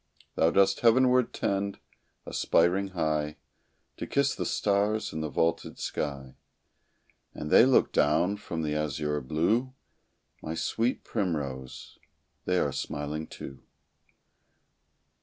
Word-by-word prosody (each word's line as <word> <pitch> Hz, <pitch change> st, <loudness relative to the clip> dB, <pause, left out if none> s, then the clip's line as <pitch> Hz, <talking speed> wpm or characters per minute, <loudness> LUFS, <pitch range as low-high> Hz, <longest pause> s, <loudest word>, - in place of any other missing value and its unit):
Thou 80 Hz, -, +3 dB
dost 95 Hz, +3 st, +3 dB
heaven 125 Hz, +2 st, +5 dB
ward 125 Hz, -1 st, +2 dB
tend, 100 Hz, 0 st, -2 dB, 0.5 s
aspiring 90 Hz, +4 st, +2 dB
high, 75 Hz, -1 st, -1 dB, 0.6 s
To -, -, -5 dB
kiss 140 Hz, -1 st, +1 dB
the -, -, -3 dB
stars 105 Hz, +2 st, 0 dB
in 80 Hz, -, -3 dB
the 80 Hz, -, -3 dB
vaulted 80 Hz, +3 st, -1 dB
sky, 70 Hz, -3 st, -4 dB, 1.0 s
And 75 Hz, -, -6 dB
they 125 Hz, -, +7 dB
look 130 Hz, -, +4 dB
down 85 Hz, +7 st, +2 dB
from 85 Hz, -5 st, -5 dB
the 75 Hz, -1 st, -1 dB
azure 75 Hz, 0 st, -2 dB
blue, 105 Hz, -, 0 dB, 0.7 s
My 80 Hz, -, -4 dB
sweet 115 Hz, +8 st, -1 dB
primrose 70 Hz, -, -4 dB, 0.5 s
they -, -, +1 dB
are -, -, +1 dB
smiling, 75 Hz, +2 st, -4 dB
too. 70 Hz, 0 st, -10 dB
80 Hz, 120 wpm, -28 LUFS, 75-105 Hz, 1.0 s, they